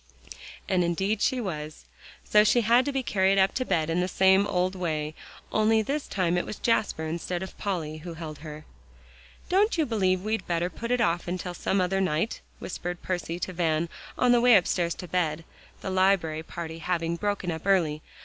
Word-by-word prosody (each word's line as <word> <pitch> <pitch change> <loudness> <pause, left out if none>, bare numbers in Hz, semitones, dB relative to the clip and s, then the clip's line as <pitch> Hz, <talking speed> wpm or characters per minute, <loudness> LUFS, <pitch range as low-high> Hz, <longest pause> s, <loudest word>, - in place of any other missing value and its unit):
And 185 -2 +2
indeed 190 +5 0
she 260 - +2
was. 155 -8 -5 0.4
So 210 0 +5
she 215 +3 +4
had 235 +3 +4
to 285 - -1
be 270 -1 -1
carried 195 -3 +2
up 195 0 +4
to 255 - -1
bed 170 -9 0
in 165 +2 0
the 180 - +1
same 190 +2 +4
old 180 -1 0
way; 155 -4 -2 0.4
only 220 0 +3
this 280 +6 -2
time 180 -2 +1
it - - -3
was - - -5
Jasper 215 -8 0
instead 170 +3 -3
of 190 - -8
Polly 165 -6 -3
who 165 +1 -8
held 155 -2 -7
her. 155 -1 -9 0.8
"Don't 395 +2 +2
you 320 - +2
believe 190 -6 +1
we'd 215 -2 -2
better 175 +1 0
put 235 - -6
it 250 -1 +2
off 175 -3 0
till 180 0 -5
some 190 +2 0
other 190 +1 +1
night?" 175 +4 -1 0.2
whispered 175 -1 -5
Percy 175 -2 -3
to 185 - -3
Van 165 -1 0 0.3
on 250 - +4
the 240 -1 +5
way 245 -1 +7
upstairs 175 -2 +2
to 180 - -8
bed, 165 -2 -1 0.4
the 190 - -4
library 185 -4 +2
party 165 0 -7
having 170 -1 -1
broken 200 -1 -2
up 160 +3 -6
early. 160 -6 +2
185 Hz, 195 wpm, -27 LUFS, 165-205 Hz, 0.8 s, way